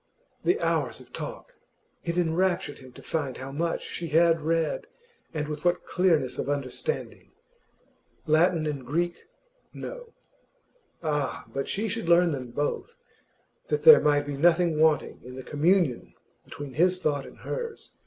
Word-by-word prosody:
The 370 +5 +2
hours - - 0
of - - -16
talk! - - -7 0.5
It 170 +1 -2
enraptured 175 -2 +1
him 130 -1 -13
to - - -13
find 140 -6 -2
how 130 +1 -7
much 165 +4 -1
she 170 - -5
had 165 +1 +4
read, 160 0 0 0.4
and 150 -2 -3
with 150 -1 -5
what 175 0 +1
clearness 165 -8 +1
of - - -2
understanding. 145 - -3 0.9
Latin 160 +1 +3
and 145 -3 -3
Greek, 170 +6 -2 0.5
no. - - -8 0.9
Ah! 150 -3 -1
but 135 0 -3
she 215 +3 -1
should 215 -4 -3
learn 170 0 +5
them 130 -4 -4
both, 145 - -3 0.7
that 450 - -1
there 470 -1 +10
might 145 -1 +3
be 145 -1 -4
nothing 170 0 +3
wanting 155 -2 +2
in 125 +1 -10
the 130 - -7
communion 155 -2 +1 0.3
between 145 -2 -8
his 180 +6 +3
thought 145 -5 -1
and - - -14
hers. 470 -2 -6
160 Hz, 150 wpm, -27 LUFS, 145-180 Hz, 0.9 s, there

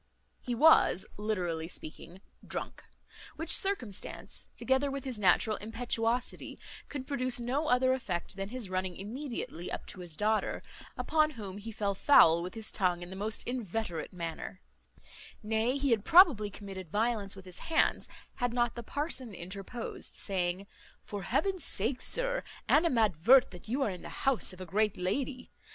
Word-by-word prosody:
He 245 -2 -3
was, 295 - +5
literally 180 -6 -2
speaking, 170 +2 -10 0.2
drunk; - - -5 0.5
which 325 0 +3
circumstance, 255 - -3
together 265 +2 +1
with 275 -1 -4
his 255 -5 -3
natural 210 +3 +3
impetuosity, 230 +2 -2 0.3
could 280 -3 -5
produce 255 -3 -1
no 265 +6 -1
other 255 0 +4
effect 190 -9 -3
than 195 0 -4
his 245 -3 -5
running 185 -1 -2
immediately 225 - -5
up - - -5
to - - -8
his 175 -3 -6
daughter, 215 +1 0 0.3
upon 310 -1 +2
whom 200 -2 -6
he 225 +2 -7
fell 205 -2 -1
foul 170 - +6
with 180 +5 -6
his 220 -1 -3
tongue 180 -3 0
in 175 - -9
the - - -6
most 215 +3 -1
inveterate 220 -8 -3
manner; 170 +1 -6 0.8
nay, 225 +5 +1
he 280 -2 0
had 220 -3 +2
probably 320 - +6
committed 195 -3 -8
violence 210 0 0
with 190 -1 -11
his 180 -1 -7
hands, 325 - +1 0.3
had 245 -1 0
not 240 -1 +1
the 235 - -6
parson 260 - -3
interposed, 195 +7 -6
saying, 185 -1 -1 0.4
"For 205 -1 -6
heaven's 375 - 0
sake, 245 +4 +4
sir, - - 0 0.3
animadvert 240 - +5
that 180 +2 -11
you 265 +4 +1
are 215 - 0
in 180 - -7
the - - -8
house 270 -3 0
of 185 - -12
a 185 - -6
great 210 +4 +1
lady. 255 +8 -2
220 Hz, 160 wpm, -31 LUFS, 190-255 Hz, 0.8 s, foul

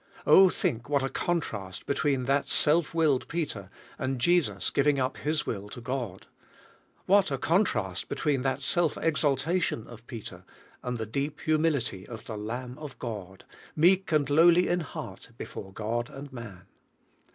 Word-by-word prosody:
Oh, 190 0 +8
think 120 -5 -2
what 140 -2 +2
a 135 - -1
contrast 110 - -3
between 140 -2 0
that 140 +2 +1
self 160 +2 +3
willed 155 -6 +2
Peter, 140 - -3 0.3
and 130 0 -1
Jesus 175 +5 +2
giving 140 0 +2
up 130 +1 -1
His 155 +1 -1
will 105 -1 -4
to 120 - -8
God! 120 -6 -4 0.8
What 200 -1 +4
a 135 - -1
contrast 125 - 0
between 140 -4 0
that 135 +1 -1
self 170 +1 +2
exaltation 150 -3 +1
of 120 0 -13
Peter, 100 -7 -8 0.4
and 125 -1 -3
the 110 - -3
deep 140 +7 -3
humility 150 - 0
of 115 -2 -9
the 110 - -5
Lamb 125 +5 -5
of 150 -3 -8
God, 100 -5 -7 0.3
meek 180 +4 +4
and 150 -3 +3
lowly 170 +5 +5
in 175 - +2
heart 160 - -7
be - - -5
fore 95 - -8
God 115 +5 -2
and 140 -1 -10
man! 105 -7 -9
135 Hz, 160 wpm, -28 LUFS, 115-155 Hz, 0.8 s, Oh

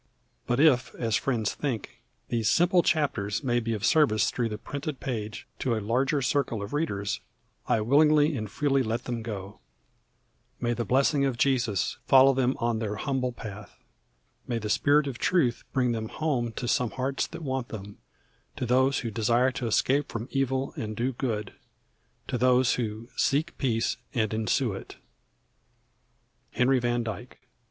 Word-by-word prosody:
But 120 +2 +1
if, 130 -5 +4
as 115 -3 0
friends 110 -2 0
think, 130 -8 -4 0.3
these 115 -2 +1
simple 175 +1 +4
chapters 140 -11 0
may 120 -2 +2
be 115 -1 -2
of 105 0 -2
service 145 -10 +3
through 120 -2 -1
the 105 - -4
printed 145 +4 -5
page 110 -5 -4
to 125 -3 0
a - - -1
larger 130 +7 0
circle 125 -6 0
of 100 - -7
readers, 105 -10 -1 0.5
I 110 - +2
willingly 150 +5 +4
and 110 -4 -4
freely 140 +2 +1
let 115 0 -2
them 120 -2 -3
go. 105 -3 -7 1.0
May 120 0 0
the 120 0 -3
blessing 140 +2 +2
of 135 -3 0
Jesus 120 -7 +1
follow 135 0 +7
them 130 0 +1
on 120 -2 0
their 105 -2 -2
humble 130 +2 -1
path. 105 -3 -9 0.7
May 120 - -1
the 105 -2 -3
Spirit 145 +5 +3
of 135 -3 -5
Truth 150 -11 +1
bring 125 -3 +1
them 110 -1 -3
home 130 -7 -1
to 120 - -4
some 125 0 +1
hearts 130 +2 -2
that 165 0 -9
want 130 -3 -2
them, 105 -2 -9 0.6
to - - -3
those 130 +3 +2
who 115 - -4
desire 120 +4 +2
to 125 -2 -4
escape 135 +6 +1
from 115 +1 -4
evil 135 0 -1
and 110 -1 -4
do 125 +3 0
good, 110 -5 -3 0.7
to 125 - -2
those 125 0 +4
who 110 -1 -3
"seek 150 +5 +1
peace 115 -5 0 0.2
and 110 -3 0
ensue 110 -2 0
it." - - -9 1.6
HENRY 130 +1 +3
VAN 120 0 0
DYKE. 110 -5 -7
125 Hz, 165 wpm, -27 LUFS, 110-135 Hz, 1.6 s, follow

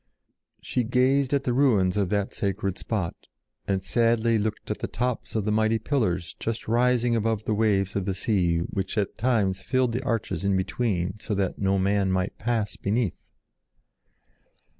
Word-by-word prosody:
She 125 - 0
gazed 130 +3 +2
on 140 -1 +2
the 125 - 0
ruins 110 -9 +3
of 100 -3 +1
that 100 0 -1
sacred 100 -1 -2
spot 100 -7 -2 0.5
and 95 -1 0
sadly 115 +2 +2
looked 105 +1 -3
at - - -3
the - - -3
tops 125 -1 -3
of 110 -3 0
the 105 - +1
mighty 110 +1 +2
pillars 95 - -1
just 115 0 -3
rising 120 +1 +2
above 110 -1 0
the 110 - -1
waves 100 -3 +1
of 100 -2 -1
the 95 -1 -1
sea 90 -7 +1
which 95 +5 -3
at 100 -2 0
times 105 -7 +1
filled 130 +4 +1
the 125 +3 -2
arches 115 -6 -2
in 100 -1 +2
between 95 -1 -1
so 105 - -2
that 95 -2 -1
no 95 0 +2
man 100 0 +1
might 95 +1 -1
pass 110 -2 -1
beneath. 105 -1 -1
105 Hz, 170 wpm, -26 LUFS, 95-120 Hz, 0.5 s, ruins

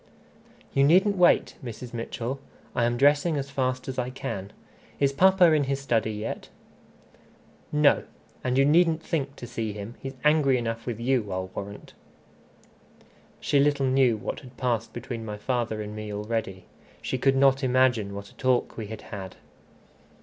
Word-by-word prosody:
"You 135 - +4
needn't 190 +8 +5
wait, 180 -2 +3
Mrs. 120 +1 -7
Mitchell. 120 +3 -4 0.4
I 120 - +2
am 120 0 0
dressing 145 +4 +3
as 140 0 -4
fast 130 -1 -1
as 130 -1 -3
I 125 0 -1
can. 115 -7 -5 0.5
Is 140 -1 +2
papa 185 +2 +5
in 150 -2 +3
his 135 0 -1
study 115 -5 0
yet?" 105 +1 -5 1.2
"No. 150 -1 +4 0.4
And 130 0 0
you 135 - +5
needn't 165 +1 +3
think 140 -4 -2
to - - -8
see 115 -3 -4
him. 105 +2 -7
He's 135 0 -7
angry 150 -3 +4
enough 115 -1 -4
with 120 -2 -3
you, 120 -4 0
I'll 95 0 -3
warrant" 100 +1 -8 1.5
She 145 - +2
little 140 -1 +3
knew 130 -3 +3
what - - -5
had 125 -3 -15
passed 120 -3 -1
between 120 -1 -6
my 105 -1 -5
father 110 -1 -2
and 105 0 -7
me 105 -1 -6
already. 105 -3 -3 0.4
She 130 - -2
could 135 +2 +3
not 135 0 +4
imagine 125 -6 +2
what 100 0 -7
a - - -21
talk 130 -1 +1
we 110 -2 -5
had 110 0 -8
had. 95 -3 -8
125 Hz, 165 wpm, -26 LUFS, 110-140 Hz, 1.5 s, needn't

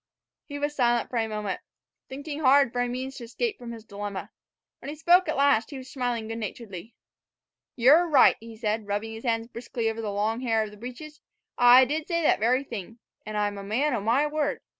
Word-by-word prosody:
He 285 - -6
was 290 +1 -2
silent 240 -3 +1
for 245 - -2
a 225 -1 +1
while, 210 -3 -3 0.5
thinking 285 +2 -6
hard 275 -3 +4
for 245 - 0
a 245 - 0
means 255 +2 -5
of - - -6
escape 415 - -3
from 240 -1 -8
his 225 -2 -10
dilemma. 205 -2 -6 0.5
When - - -8
he 295 - -5
spoke 350 +4 +4
at - - -1
last 280 -5 +3
he 280 - -7
was 260 0 -10
smiling 245 -4 -2
good 225 +1 -5
naturedly. 215 -1 -7 0.8
"Ye're 290 +8 +5
right," 290 -5 +6
he 225 0 -11
said, 215 -1 -2
rubbing 205 +2 -3
his 225 +3 -9
hands 225 -1 0
briskly 235 -1 -4
over 225 0 -6
the 210 -2 -3
long 215 +4 -1
hair 225 -3 +1
of 215 - -7
the 210 - -14
breeches; 255 +7 -9 0.3
"I 245 +1 +7
did 300 +4 -3
say 335 -2 0
that - - +3
very 250 +5 +2
thing. 225 -3 -8 0.3
An' 215 - -5
I'm 205 -1 -1
a - - -7
man 255 +9 0
o' 230 - -1
my 235 +8 +2
word. 295 -1 -1
240 Hz, 220 wpm, -26 LUFS, 220-280 Hz, 0.8 s, I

